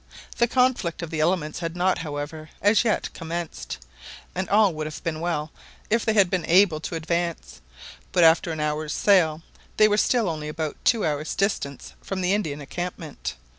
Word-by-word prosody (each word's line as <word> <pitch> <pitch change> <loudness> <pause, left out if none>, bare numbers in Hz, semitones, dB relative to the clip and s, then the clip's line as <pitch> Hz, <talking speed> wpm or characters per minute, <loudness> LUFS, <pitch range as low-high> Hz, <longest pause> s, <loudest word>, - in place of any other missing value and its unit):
The 235 - +4
conflict 245 -10 +1
of 165 - -6
the 160 - -2
elements 155 -1 0
had 165 -1 -4
not, 180 +1 +1
however, 155 0 -5
as 205 +3 +4
yet 225 -3 0
commenced; 165 - -5 0.6
and 185 +1 -3
all 205 -3 +4
would 155 0 -4
have 155 - -8
been 160 -2 -2
well 160 -2 -2 0.4
if 230 0 +3
they 220 - +1
bad 200 -3 +5
been 185 -3 0
able 175 -2 +5
to 165 - -5
advance, 170 - -3 0.5
but 175 - +4
after 165 +1 +5
an 160 - -4
hour's 150 0 -1
sail 165 -6 +3 0.3
they 215 - +7
were 210 0 +2
still 230 0 +2
only 155 -3 -3
about 155 0 -4
two 225 -2 +3
hours' 150 0 -2
distance 170 -9 -2
from 190 -1 -4
the 180 +1 +2
Indian 155 -8 -2
encampment. 165 0 -5
170 Hz, 180 wpm, -25 LUFS, 155-195 Hz, 0.6 s, they